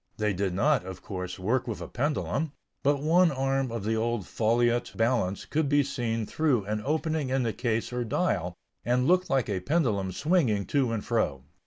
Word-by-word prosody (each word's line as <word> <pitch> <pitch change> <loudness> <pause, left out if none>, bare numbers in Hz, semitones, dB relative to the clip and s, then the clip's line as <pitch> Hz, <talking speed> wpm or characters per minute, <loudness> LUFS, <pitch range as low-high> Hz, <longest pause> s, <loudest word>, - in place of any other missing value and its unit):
They 105 -1 +1
did 95 -1 -1
not, 145 +4 +3
of 95 0 -8
course, 90 -2 -5
work 115 +7 0
with 115 - -3
a - - -6
pendulum; 150 +2 -1 0.3
but 140 0 +1
one 170 +3 +5
arm 135 -1 0
of 115 -3 -4
the 110 +2 0
old 115 -3 -1
foliot 120 +3 +1
balance 115 -5 0
could 155 -2 0
be 145 0 +4
seen 115 -5 -2
through 130 -6 +1
an 105 +1 -2
opening 155 -1 -1
in 130 0 +1
the 115 -2 -1
case 115 -1 -1
or 125 0 -1
dial, 95 - -1 0.3
and 125 +2 +1
looked 185 +1 +3
like 135 -3 +1
a 100 -4 -1
pendulum 105 - 0
swinging 125 - +1
to 135 -5 +1
and 115 -3 -3
fro. 90 - 0
120 Hz, 190 wpm, -28 LUFS, 105-140 Hz, 0.3 s, one